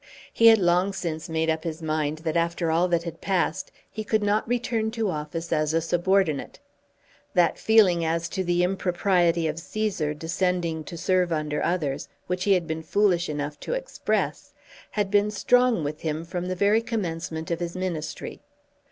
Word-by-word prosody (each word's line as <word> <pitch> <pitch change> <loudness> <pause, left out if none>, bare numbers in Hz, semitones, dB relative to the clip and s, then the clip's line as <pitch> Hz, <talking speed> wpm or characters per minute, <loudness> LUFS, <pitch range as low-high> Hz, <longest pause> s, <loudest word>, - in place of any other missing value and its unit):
He 230 - +5
had 225 -1 +9
long 180 +1 +2
since 165 -3 -4
made 160 0 0
up 160 0 0
his 160 -1 -4
mind 155 -1 -1
that 160 0 -1
after 170 0 0
all 170 +3 +3
that 170 -1 +1
had 165 -1 -7
passed 190 0 -1 0.2
he 215 - -6
could 215 0 +1
not 210 +2 +1
return 235 -2 0
to 220 -3 -1
office 160 +2 -4
as 155 0 +1
a - - +4
subordinate. 175 -1 +1 0.8
That 175 -2 +3
feeling 200 -6 +4
as 165 +1 0
to 190 - -2
the 175 0 +1
impropriety 175 -2 +1
of 155 0 -3
Cæsar 175 -5 -2
descending 170 0 -1
to 170 - -7
serve 180 +1 +1
under 150 -2 -1
others 150 -5 -1 0.2
which 180 0 -2
he 200 - +5
had 180 -3 +1
been 160 0 -3
foolish 175 0 +2
enough 145 0 -4
to - - -4
express, - - -2 0.4
had 205 -2 -1
been 205 0 +3
strong 245 -1 +3
with 150 +1 -4
him 160 0 -3
from 175 +1 -4
the 185 - -2
very 205 +4 +3
commencement 170 -7 -4
of 170 - -1
his 175 0 -4
Ministry. 175 -5 -4
175 Hz, 180 wpm, -25 LUFS, 160-195 Hz, 0.8 s, had